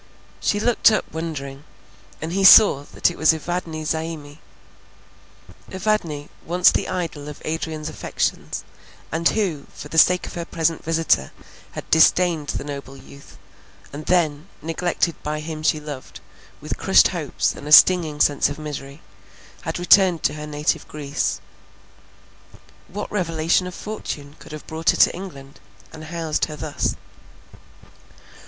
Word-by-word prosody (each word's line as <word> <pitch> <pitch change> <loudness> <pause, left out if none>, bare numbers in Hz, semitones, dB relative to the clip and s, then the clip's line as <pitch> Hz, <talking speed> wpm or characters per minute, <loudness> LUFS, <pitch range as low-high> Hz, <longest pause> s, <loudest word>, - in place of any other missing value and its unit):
She 205 - 0
looked 240 +1 +4
up 215 - 0
wondering, 145 -4 -6 0.6
and 165 +2 -4
he 195 +1 0
saw 190 -7 +8
that - - 0
it - - -12
was 160 +1 +5
Evadne 160 -1 -4
Zaimi. 160 -2 -4 1.3
Evadne, 185 -7 -1 0.2
once 180 +2 +4
the - - -2
idol 160 -5 -4
of 150 - -10
Adrian's 155 -1 -4
affections; - - -3 0.5
and 165 +1 +2
who, 180 -10 -2
for 150 - -9
the 160 - +2
sake 180 +3 +4
of - - -9
her 170 - -4
present 165 -1 -1
visitor, 160 - +1 0.4
had - - -7
disdained 160 -1 +4
the - - -3
noble 140 -1 -8
youth, 140 +1 -15 0.6
and 150 +2 -8
then, 160 -3 +1 0.2
neglected 170 +1 -1
by 150 0 -3
him 155 0 -6
she 155 0 +1
loved, 145 -3 -9 0.4
with - - -5
crushed - - +5
hopes - - -2
and 145 - -10
a - - -5
stinging 160 -2 +6
sense 145 -1 +3
of 145 - -6
misery, 145 -1 -8 0.6
had - - -4
returned 180 -1 +4
to 145 - +1
her 150 0 -7
native 150 0 -1
Greece. 145 -2 -3 1.5
What 205 +3 -6
revolution 170 -2 0
of 180 - -8
fortune 150 -9 -7
could - - -13
have 155 -1 -9
brought 160 +1 -2
her - - +3
to - - +5
England, 140 -7 -10 0.3
and 155 -1 -9
housed 160 -1 -2
her 155 - -8
thus? 150 -1 -2
160 Hz, 145 wpm, -22 LUFS, 150-175 Hz, 1.5 s, saw